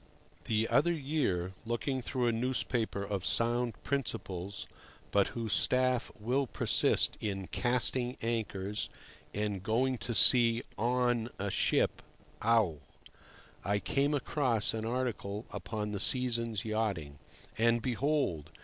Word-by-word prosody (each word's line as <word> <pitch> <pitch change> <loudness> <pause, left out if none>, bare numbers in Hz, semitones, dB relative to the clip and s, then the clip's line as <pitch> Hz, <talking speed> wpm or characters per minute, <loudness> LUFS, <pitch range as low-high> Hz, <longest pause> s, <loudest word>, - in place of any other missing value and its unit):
THE 110 0 +1
other 170 +5 +3
year, 135 - -1
looking 120 +3 -2
through 125 +1 -2
a 120 - +3
newspaper 115 -3 -1
of 100 -2 -3
sound 120 +3 +2
principles, 100 -8 -3 0.5
but 100 -1 +3
whose 115 -3 -2
staff 130 -1 +2
will 130 +5 0
persist - - +1
in 95 -2 -3
"casting" 125 0 +1
anchors 105 -3 -2 0.4
and 105 -2 -3
going 125 +5 0
to 120 +4 -3
sea 115 -1 +7
"on" 120 0 0
a 100 0 -3
ship - - +1 0.4
(ough!), 110 -8 +3 0.9
I 100 0 +1
came 140 +7 0
across 125 -6 0
an 110 0 -3
article 115 -4 -3
upon 105 -2 -4
the 100 - -3
season's 115 -4 +2
yachting. 100 -10 -2 0.4
And, 115 +1 +3
behold! 125 - -1
115 Hz, 120 wpm, -31 LUFS, 105-125 Hz, 0.9 s, sea